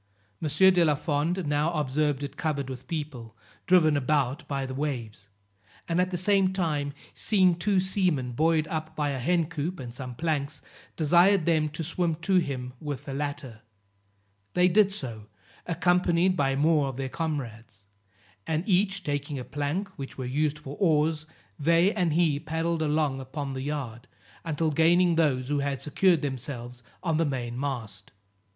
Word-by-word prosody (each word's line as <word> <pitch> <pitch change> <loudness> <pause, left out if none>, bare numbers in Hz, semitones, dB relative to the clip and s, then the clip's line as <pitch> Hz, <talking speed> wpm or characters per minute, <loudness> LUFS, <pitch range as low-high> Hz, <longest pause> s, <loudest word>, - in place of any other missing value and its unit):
M. 155 - -1
de 180 +3 +5
la 150 -3 +3
Fond 155 +5 -1
now 150 +2 +1
observed 145 -1 0
it 140 - -6
covered 140 -4 -2
with 130 0 -9
people, 130 -8 -6 0.3
driven 165 -5 +5
about 140 +2 0
by 135 -1 -2
the 130 - -5
waves; 115 -8 -4 0.6
and 170 +1 +2
at 180 - 0
the 180 - -2
same 190 +1 +2
time, 150 -6 -1 0.2
seeing 185 -4 +3
two 185 +3 +1
seamen 180 -9 0
buoyed 155 +4 +2
up 160 0 -4
by 150 -1 0
a 135 -2 -2
hen 170 +6 +2
coop 165 +2 -4
and 120 -3 -7
some 125 -1 -7
planks, 150 -1 -2 0.4
desired 175 +3 +4
them 155 -2 +2
to 155 +2 -5
swim 170 0 0
to 170 +4 +1
him 130 -7 -2
with 145 -3 -5
the 135 - -5
latter; 140 -5 -5 0.9
they 180 0 +5
did 200 +2 +4
so, 115 - -6 0.4
accompanied 175 +1 +2
by 135 -5 +1
more 150 0 +3
of 135 -2 -5
their 135 -1 -2
comrades, 120 - -5 0.6
and 160 +1 0
each 195 0 +2
taking 145 -1 -3
a 125 - -4
plank, 145 +8 -2
which 135 - -7
were 130 - -4
used 150 +3 0
for 145 -1 -8
oars, 155 -3 +2 0.3
they 170 +6 +4
and 175 -6 +1
he 160 -3 +2
paddled 165 +1 -2
along 150 -3 +1
upon 135 +1 -5
the 130 - -4
yard, 130 -4 -5 0.4
until 160 -1 0
gaining 170 +3 +4
those 140 -6 +1
who 145 -1 +1
had 140 -1 -1
secured 160 +3 +2
themselves 125 -3 -5 0.2
on 165 -4 +1
the 165 - +3
main 125 -5 -3
mast. 115 -8 -5
150 Hz, 165 wpm, -27 LUFS, 135-170 Hz, 0.9 s, de